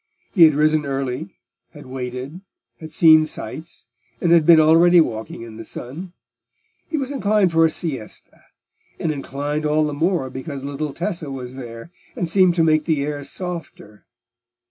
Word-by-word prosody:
He 175 -6 +8
had 155 -2 +4
risen 155 +1 +2
early; 135 +4 -4 0.4
had 150 -2 -12
waited; 130 +5 -6 0.4
had 160 -1 -10
seen 155 0 +6
sights, 160 -2 -7 0.3
and 170 - +1
had 165 -3 +5
been 165 -2 +8
already 165 +3 +6
walking 110 -6 -2
in 110 -2 -10
the 115 - -7
sun: 165 +13 -8 0.8
he 315 - -2
was 270 -1 -3
inclined 210 -8 +2
for 165 0 +4
a - - +3
siesta, 140 -9 -7 0.6
and 160 - -1
inclined 145 +1 -4
all 155 +1 +2
the 150 - -3
more 160 -3 0
because 135 0 -7
little 145 +1 -4
Tessa 170 -2 -4
was 130 -2 -7
there, 120 +2 -9 0.2
and 175 - -2
seemed 185 0 +3
to 165 - +3
make 155 -1 +2
the 150 -4 0
air 145 -1 -4
softer. 165 - -8
155 Hz, 165 wpm, -21 LUFS, 135-170 Hz, 0.8 s, He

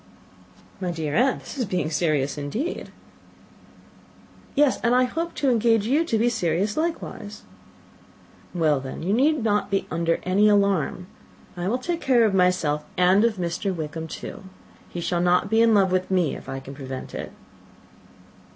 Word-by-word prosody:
"My 185 -2 -2
dear 160 -4 -3
aunt, 255 - +2
this 280 - -9
is 245 - +1
being 180 -5 -2
serious 150 -4 0
indeed." 210 - -4 1.7
"Yes, 290 -2 +3
and 240 +1 +2
I 255 - +5
hope 330 +7 -3
to 275 -3 +1
engage 225 -2 +3
you 285 +8 +2
to 230 -8 0
be 230 +2 +2
serious 200 -2 0
likewise." 310 -10 -4 1.1
"Well, 155 -5 +2
then, 130 +3 -7
you 190 +4 0
need 285 +3 +2
not 210 -2 +1
be 195 -1 0
under 165 +1 0
any 200 +4 +3
alarm. 200 -4 +1 0.5
I 175 0 -3
will 235 +5 +1
take 335 +6 -3
care 250 -3 +4
of 210 - +1
myself, 180 -5 +2
and 185 +3 +4
of 230 -2 +2
Mr. 180 +2 -2
Wickham 160 0 -5
too. 195 +5 -8 0.4
He 175 - -5
shall 175 0 0
not 180 +3 +2
be 225 +1 +4
in 230 -1 +5
love 195 -2 +3
with 185 0 0
me, 180 -5 +1
if - - -10
I 135 0 -4
can 135 +1 -10
prevent 135 -2 -7
it." - - -6
190 Hz, 170 wpm, -24 LUFS, 165-230 Hz, 1.7 s, I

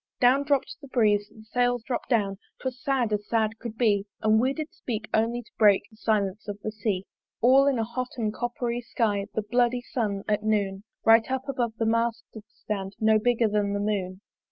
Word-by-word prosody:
Down 255 +3 +5
dropt 280 -2 0
the 280 - -10
breeze, 210 -5 +2
the 220 - -15
Sails 245 +1 0
dropt 245 0 -4
down, 200 -5 +1 0.2
'Twas 255 -1 -5
sad 255 -6 +1
as 210 0 -2
sad 225 -1 0
could 230 -2 -7
be 205 -4 +2 0.2
And 220 0 +4
we 255 +3 +2
did 310 +2 -5
speak 220 -3 -4
only 235 +2 +1
to - - -24
break 205 -3 +6
The 220 - -19
silence 210 -2 -1
of 205 0 -5
the 215 - -2
Sea. 205 -3 -2 0.3
All 265 +3 +5
in 275 -3 +2
a 225 - +1
hot 245 +3 -4
and 215 -3 -1
copper 240 0 -2
sky 210 -4 -1
The 220 - 0
bloody 245 +3 +1
sun 205 -6 -2
at 210 -1 +1
noon, 205 -2 0 0.2
Right 225 +1 +6
up 265 +1 -2
above 245 -4 -1
the 225 - 0
mast 230 +1 +1
did 220 -2 -10
stand, 195 -2 -5
No 220 0 +4
bigger 235 0 +2
than 205 -1 0
the 200 - -1
moon. 195 -2 -2
220 Hz, 205 wpm, -26 LUFS, 210-245 Hz, 0.3 s, break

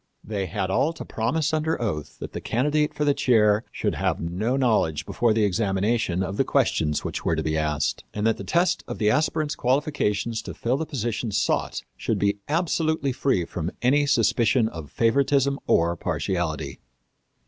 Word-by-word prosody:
They 100 -3 -3
had 95 +2 -2
all 155 +11 +2
to - - -8
promise 155 +8 -1
under 155 +1 0
oath 95 -11 -3
that - - -8
the - - -5
candidate 150 +5 +1
for 150 - -2
the 145 - +4
chair 110 -5 +3
should - - -1
have - - -1
no 100 +10 -1
knowledge 110 - +1
before 120 -2 +1
the 110 0 +2
examination 100 -1 +1
of 95 +2 -4
the - - +3
questions 75 -2 +1
which - - -4
were 80 - +1
to 80 - -2
be 80 0 -1
asked, 75 -1 -1
and 105 0 -3
that 115 - +2
the - - -6
test 175 +1 +1
of - - -5
the 105 -1 +2
aspirant's 155 +2 +1
qualifications 120 -5 0
to - - -8
fill 125 +3 0
the 160 +1 -3
position 120 -5 -2
sought 105 0 0
should - - -1
be 100 0 +1
absolutely 160 -3 0
free 125 -8 0
from 85 0 -4
any 145 +3 +3
suspicion 120 -2 +3
of 80 -6 -8
favoritism 140 +3 +2
or 85 +1 +3
partiality. 80 -6 -2
115 Hz, 180 wpm, -25 LUFS, 95-140 Hz, -, the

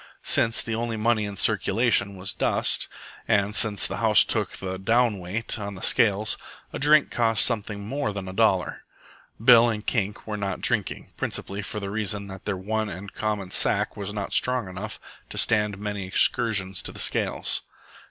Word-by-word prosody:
Since 115 0 +2
the 115 - -3
only 115 0 -2
money 110 -1 +1
in 100 -1 -6
circulation 100 0 +2
was 95 0 -4
dust, - - 0 0.4
and 100 0 +2
since 105 -2 +3
the - - -3
house 110 -2 +5
took - - -1
the 95 0 -5
"down 115 +1 +2
weight" 100 +6 -3
on 100 -1 -5
the 95 - -10
scales, 105 -3 +3 0.4
a - - -4
drink 150 +1 +5
cost 115 -2 +2
something 105 -3 -2
more 135 0 -2
than 100 -2 -6
a 95 - -6
dollar. 95 -4 +1 0.6
Bill 120 -1 +8
and 105 -2 -3
Kink 105 -4 -2
were 105 -1 -4
not 100 -1 -3
drinking, - - -1
principally 100 +1 -3
for 105 - -5
the 100 -1 -5
reason 105 -1 -2
that 95 -1 -10
their 105 -2 -2
one 110 +3 -2
and 100 +1 -8
common 105 -4 -3
sack - - +1
was 100 -1 -5
not 105 -1 -4
strong 125 -4 +1
enough 95 +4 -7 0.3
to - - -8
stand 105 -2 +2
many 105 -2 -4
excursions 95 -3 +1
to - - -6
the - - -12
scales. - - 0
105 Hz, 180 wpm, -25 LUFS, 100-115 Hz, 0.6 s, Bill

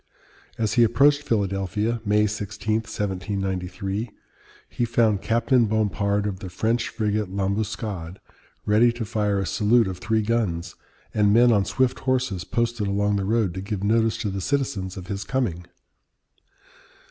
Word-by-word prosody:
As 110 -2 0
he 120 - +5
approached 140 +6 +4
Philadelphia 105 0 -1
(May 105 0 +3
16, 105 +1 -2
1793) 95 0 -3 0.6
he - - -3
found 115 -4 +2
Captain 115 +2 +2
Bompard 105 -1 0
of 100 -3 -3
the 95 -3 -7
French 110 +6 0
frigate 105 -2 -1
L'Ambuscade 100 -2 -3 0.5
ready 110 +3 +4
to 120 -1 -4
fire 105 -2 0
a 95 - -1
salute 110 +7 +3
of 90 -1 -5
three 110 +2 0
guns, 105 -7 -1 0.4
and 105 -1 +3
men 120 +3 +6
on 100 -3 +3
swift 130 -1 0
horses 125 -9 -1
posted 115 -1 -1
along 100 +1 +1
the 100 - -1
road 110 -3 +1
to 95 - -5
give 100 0 -4
notice 110 +1 +2
to 105 -3 -2
the 95 0 -4
citizens 100 -7 -2
of 90 - -7
his 100 +1 -4
coming. 105 -10 -2
105 Hz, 145 wpm, -24 LUFS, 95-115 Hz, 0.6 s, men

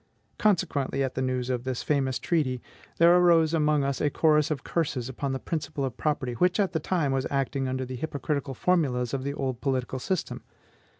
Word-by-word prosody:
Consequently, 155 -9 +1
at 130 - -2
the 130 - -2
news 130 -1 -1
of 125 -1 -2
this 130 -1 -3
famous 135 -3 +1
treaty, 140 -7 0 0.4
there 170 +1 +6
arose 170 -3 +5
among 150 -2 +2
us 140 0 -1
a 145 - +2
chorus 150 0 +3
of 145 -4 -3
curses 145 -7 -1
upon 135 +1 -3
the 135 - -1
principle 145 -1 -3
of 130 -4 -4
property, 140 -5 -1
which 180 - +2
at 195 -2 +2
that 160 - -1
time 160 -5 0
was 135 -1 0
acting 135 -1 -1
under 130 0 -2
the 130 +1 -6
hypocritical 140 -1 -3
formulas 135 -10 +1
of 135 -1 -2
the 140 +1 -3
old 130 -4 -3
political 130 -1 -1
system. 185 +6 -3
140 Hz, 195 wpm, -27 LUFS, 130-160 Hz, 0.4 s, there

